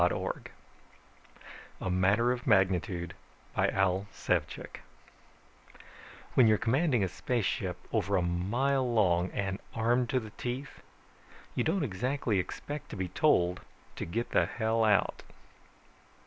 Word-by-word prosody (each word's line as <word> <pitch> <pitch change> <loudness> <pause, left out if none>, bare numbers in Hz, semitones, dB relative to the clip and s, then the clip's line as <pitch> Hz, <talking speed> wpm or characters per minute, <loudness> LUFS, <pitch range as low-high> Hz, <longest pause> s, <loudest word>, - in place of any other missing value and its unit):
net 90 - +4 1.7
A 95 - -2
MATTER 100 +7 +3
OF 125 +1 -4
MAGNITUDE 95 -4 +2 0.4
By - - +2
AL 95 +1 +1
SEVCIK - - -2 1.6
_When 125 - +7
you're 110 -1 +5
commanding 125 - +2
a - - +1
spaceship 115 +4 -1 0.2
over - - +1
a 90 - +2
mile 120 +10 0
long, 90 -5 +3
and 95 0 -3 0.2
armed 120 +2 +2
to 130 -3 +2
the 110 -3 -9
teeth, 125 +3 -5 0.7
you - - 0
don't 195 -4 +1
exactly 120 -1 0
expect 145 +10 -5
to - - -6
be 95 -2 -3
told 90 - +2 0.3
to - - -4
get 115 +8 -3
the - - +3
hell 110 0 0
out 105 -2 +2
110 Hz, 125 wpm, -30 LUFS, 95-125 Hz, 1.7 s, When